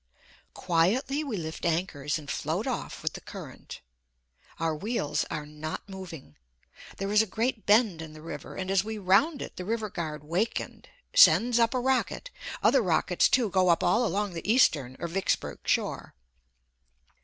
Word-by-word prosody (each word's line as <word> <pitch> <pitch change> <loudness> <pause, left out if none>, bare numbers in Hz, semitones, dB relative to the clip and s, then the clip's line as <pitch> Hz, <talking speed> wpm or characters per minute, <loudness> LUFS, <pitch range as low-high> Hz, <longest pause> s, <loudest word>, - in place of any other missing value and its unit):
Quietly 240 - +1
we 260 -8 -3
lift 160 -2 -6
anchors 160 -4 -1
and 150 -2 -10
float - - -2
off - - -4
with - - -1
the - - -8
current. - - -10 0.8
Our 165 -1 0
wheels 155 -5 -1
are 150 - -4
not 150 +4 -6
moving. 185 - -10 0.6
There 195 +1 -3
is 210 +1 +6
a 220 - -1
great 225 +3 -2
bend 205 -5 +4
in 160 -1 -8
the 155 - -12
river, 165 - -7
and 190 0 -3
as 195 -1 +3
we 220 0 -5
round 210 - +3
it - - -10
the 180 - -4
river 215 +1 -2
guard 155 -4 -5
wakened, 180 +9 -3 0.3
sends 240 - +6
up 230 +2 +3
a - - +2
rocket, 265 - 0 0.3
other - - +5
rockets - - +2
too 235 -6 +2
go 185 -1 +3
up 170 - +3
all 220 +8 +3
along 205 -2 -1
the 170 +5 -2
eastern 145 - +3
or 170 - -3
Vicksburg 190 +3 -1
shore. - - -1
190 Hz, 165 wpm, -28 LUFS, 165-230 Hz, 0.8 s, is